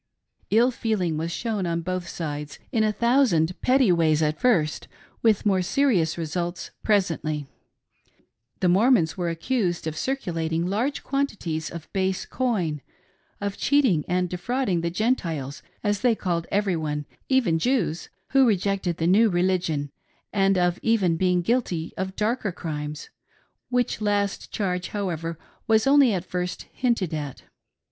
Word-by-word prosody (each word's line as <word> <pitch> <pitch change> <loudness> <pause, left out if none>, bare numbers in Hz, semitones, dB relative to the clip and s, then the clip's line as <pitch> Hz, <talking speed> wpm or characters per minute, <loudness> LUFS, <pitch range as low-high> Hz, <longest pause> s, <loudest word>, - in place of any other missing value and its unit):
Ill 235 +4 +4
feeling 210 -9 -1
was 165 +2 -2
shown 210 -2 -2
on 170 0 -1
both 185 0 -3
sides; 150 -3 -5
in 220 - +2
a 215 - +2
thousand 225 - +3
petty 255 -5 +4
ways 160 -2 +3
at 150 0 0
first, 170 -12 +1 0.3
with 220 -3 +3
more 190 -2 +3
serious 180 - +2
results 170 +2 -3
presently., 165 -8 0 1.2
The 185 - +3
Mor 195 +8 +4
mons 170 -11 +3
were 175 -2 -1
accused 175 0 -1
of 160 -1 -3
circulating 165 - -2
large 230 +10 -1
quantities 210 - -2
of 170 -2 -8
base 190 -1 0
coin, 185 - -1 0.6
of 200 -1 -3
cheating 255 - +3
and 180 0 +1
defrauding 185 +1 -1
the 170 - -1
Gentiles, 170 - -1 0.2
as 205 -1 0
they 240 -2 +3
called 170 -5 -2
every 200 -2 +1
one— 150 -2 -3 0.2
even 240 -12 +3
Jews 195 - 0
— - - -47
who 270 -2 +5
rejected 195 -4 0
the 165 - -1
new 210 +6 +5
religion, 175 -6 0 0.4
and 195 -1 +3
of 175 0 +1
even 205 -7 +2
being 180 0 +1
guilty 180 -7 -1
of 190 0 -4
darker 215 -1 0
crimes; 150 -3 -6 0.3
— - - -37 0.2
which 245 -3 0
last 205 -1 -1
charge, 185 -3 -2
however, 165 -5 -3 0.3
was 220 -1 +4
at 265 -10 +4
first 180 0 -4
only - - -32
hinted 230 -10 +1
at. 145 -4 -5
185 Hz, 150 wpm, -25 LUFS, 165-220 Hz, 1.2 s, who